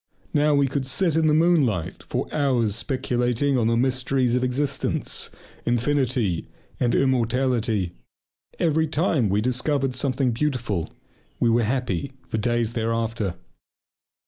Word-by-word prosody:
Now 150 0 +3
we 140 0 +4
could 135 0 -2
sit 165 +4 +1
in 160 -1 +3
the 150 - +4
moonlight 150 - +2
for - - -3
hours 125 -8 +1
speculating 125 +1 0
on 115 -3 +2
the 115 0 +2
mysteries 130 0 +1
of 125 - +1
existence, 135 +2 -1 0.3
infinity, 120 - 0 0.3
and 120 -1 +2
immortality. 120 -6 +1 0.7
Every 160 -1 +2
time 150 - +1
we 100 +2 +1
discovered 130 +3 0
something 130 0 0
beautiful 120 - -1 0.5
we 115 - +3
were 120 +1 +3
happy 125 0 -1
for 110 - -2
days 120 0 0
thereafter. 115 -4 -1
125 Hz, 125 wpm, -24 LUFS, 115-140 Hz, 0.7 s, we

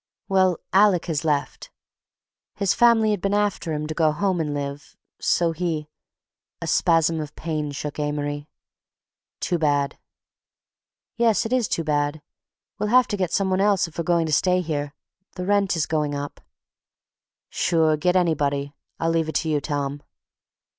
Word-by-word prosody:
"Well, 185 -3 +3 0.2
Alec 195 -3 +4
has 160 -3 -2
left. 150 -3 -2 0.9
His 200 -2 +1
family 230 -2 +4
had 205 -4 -1
been 195 +2 0
after 205 -5 0
him 150 0 -2
to 155 - -4
go 155 -1 +2
home 185 +3 0
and 150 -2 -2
live, 145 0 -5 0.2
so 170 -1 +2
he—" 160 -2 -3 0.7
A - - -5
spasm 165 -1 +2
of 150 -1 -8
pain 155 -2 -3
shook 145 +1 -5
Amory. 145 0 -3 0.9
"Too 175 - -1
bad." 145 -2 0 1.2
"Yes, 230 -3 +3
it 225 - -2
is 250 -5 +2
too 165 - -1
bad. 145 0 -1 0.6
We'll 210 0 -1
have 250 +2 +6
to - - -1
get 185 -3 -1
some 195 -1 +1
one 185 +1 +2
else 200 -3 +3
if 165 - -10
we're - - 0
going 170 0 +2
to 155 - -2
stay 180 +4 +3
here. 145 -3 -3 0.4
The 180 - -4
rent's 195 -5 +2
going 150 -2 -1
up." 145 0 -6 1.1
"Sure. 160 -3 +2
Get 180 +4 +1
anybody. 145 -5 +1 0.3
I'll 165 - +1
leave 165 -1 0
it - - -6
to 160 - 0
you, 150 -2 +1
Tom." 145 -1 -3
160 Hz, 160 wpm, -23 LUFS, 150-185 Hz, 1.2 s, have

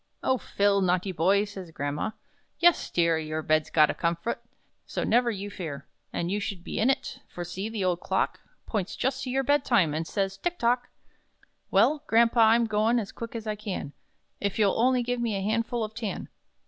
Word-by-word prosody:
"(Oh, 260 -1 +2
Phil! 200 0 +2
naughty 185 +1 +1
boy!)" 190 +4 +3
says 195 -4 -9
grandma; 145 +4 -2 0.5
"yes, 345 -1 +4
dear 165 -2 +2
Your 155 0 -3
bed's 155 0 +2
got 155 -2 +5
a - - -5
'comfut,' 170 +6 -1 0.5
so - - -2
never 240 +1 +3
you 205 -2 -4
fear 155 -8 -6 0.3
And 170 +1 -2
you 205 - 0
should 200 -3 -5
be - - -4
in 230 - +3
it, 270 - -1
for 175 - -6
see, 190 +5 -4
the 215 -4 -2
old 180 -1 +1
clock - - -1 0.3
Points 200 -5 -2
just 265 +1 -1
to - - -4
your 270 +2 +1
bed 285 +1 +3
time, 185 - +3
and 160 +1 -2
says 195 -1 -1
'tick 350 - -2
tock!'" 245 +1 +1 0.8
"Well, 300 0 +4
grampa, 230 +1 +4
I'm 230 +1 +6
goin' 220 +2 +2
as 215 -4 -2
quick 230 0 -7
as 225 -1 -5
I 215 -1 -2
can, 200 -9 -5 0.5
If 200 -1 -2
you'll 210 -2 +3
only 250 0 +3
give 245 0 -2
me 230 -3 0
a 195 - -2
handful 230 +3 0
of 215 0 -5
'tan.' 215 -2 -4
210 Hz, 200 wpm, -27 LUFS, 180-235 Hz, 0.8 s, I'm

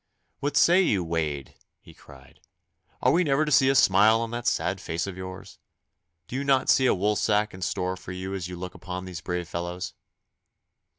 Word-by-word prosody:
'What 145 +1 -1
say 175 +3 +6
you, 100 - +1
Wade!' 80 -4 -3 0.3
he - - -16
cried. 65 -2 -17 0.6
'Are - - +5
we 175 +2 +3
never 150 -1 +2
to 150 - -3
see 135 -1 +5
a 135 - +2
smile 110 0 +5
on 115 -1 -4
that 120 0 -4
sad - - 0
face 85 +1 -3
of 100 -2 -6
yours? 95 0 -9 0.7
Do - - -7
you 135 - -1
not 135 -2 +3
see 130 - +4
a - - +3
woolsack 105 +2 +1
in 95 - -10
store 90 +1 -2
for 95 0 -10
you 95 +1 -5
as 95 -3 -4
you 90 - -7
look 90 +1 -7
upon 90 +1 -7
these 90 -2 -7
brave 90 -1 -3
fellows? 85 +1 -5
95 Hz, 195 wpm, -26 LUFS, 90-120 Hz, 0.7 s, say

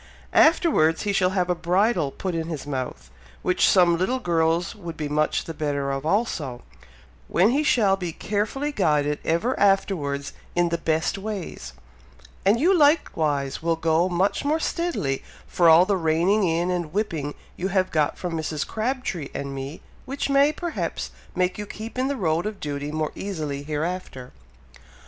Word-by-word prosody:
Afterwards 300 - +4
he 205 -1 0
shall 185 -2 +3
have 180 -1 +2
a 180 - +2
bridle 175 -1 +1
put 185 +6 -4
in 165 -1 -2
his 155 -5 -5
mouth, 125 - -5 0.3
which 180 - +3
some 175 -3 +4
little 220 +8 +1
girls 170 -5 +1
would 170 -7 -8
be 150 - -3
much 150 +1 0
the 165 - -6
better 145 -2 -2
of 135 +2 -3
also, 160 - -1 0.6
when 190 +6 +3
he 280 +4 +2
shall 215 -10 +3
be 180 -3 -4
carefully 215 - -2
guided 150 - +1
ever 170 +11 +1
afterwards 170 -8 +1 0.2
in 175 0 +2
the 170 0 -1
best 160 +4 0
ways; 195 - -6 0.7
and 205 +4 +4
you 360 +7 +4
likewise 160 - +2
will 165 0 +1
go 165 +2 +2
much 185 +3 0
more 300 +3 +1
steadily 320 - -1 0.2
for 170 -2 +3
all 165 +3 +7
the 200 0 +1
reining 170 +5 +2
in 170 +2 0
and 175 -3 -3
whipping 160 -8 -2 0.2
you 185 - -2
have 190 -1 +1
got 150 -2 +1
from 180 -2 -4
Mrs. 155 -2 -2
Crabtree 220 - -3
and 140 0 -4
me, 135 +4 -6 0.2
which 275 +1 -3
may, 280 +2 +5
perhaps, 340 +2 -4 0.2
make 185 +2 0
you 205 - -5
keep 225 +5 -7
in 260 - +1
the 280 0 -2
road 170 -2 0
of 215 -2 -6
duty 145 0 -4
more 155 0 -2
easily 155 -8 -4
hereafter." 150 -3 -4
175 Hz, 165 wpm, -24 LUFS, 155-205 Hz, 0.7 s, all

